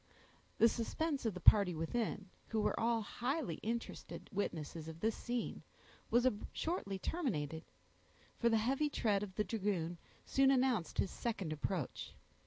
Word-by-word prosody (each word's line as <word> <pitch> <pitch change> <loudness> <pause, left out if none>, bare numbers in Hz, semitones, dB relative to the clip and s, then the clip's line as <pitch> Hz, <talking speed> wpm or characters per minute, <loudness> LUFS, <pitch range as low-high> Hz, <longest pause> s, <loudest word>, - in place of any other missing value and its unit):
The 230 - +7
suspense 270 +4 -1
of 210 - -1
the - - -4
party 180 0 +7
within, 200 +4 -2 0.2
who 220 - -1
were 210 - +1
all 230 -1 +2
highly 245 - -2
interested 230 +1 -4
witnesses 160 -5 -3
of 160 0 -7
this 220 +3 +1
scene, 240 -1 -3 0.5
was 240 +2 +4 0.3
shortly 315 - -2
terminated: 160 - -2 0.8
for 235 - +4
the 225 - +4
heavy 270 +7 +1
tread 210 -7 +1
of 195 -3 -5
the 210 - +2
dragoon 190 -6 -1 0.3
soon 270 0 +4
announced 255 -9 +2
his 190 - +1
second 195 -9 -2
approach. 155 -1 -3
215 Hz, 145 wpm, -36 LUFS, 180-240 Hz, 0.8 s, The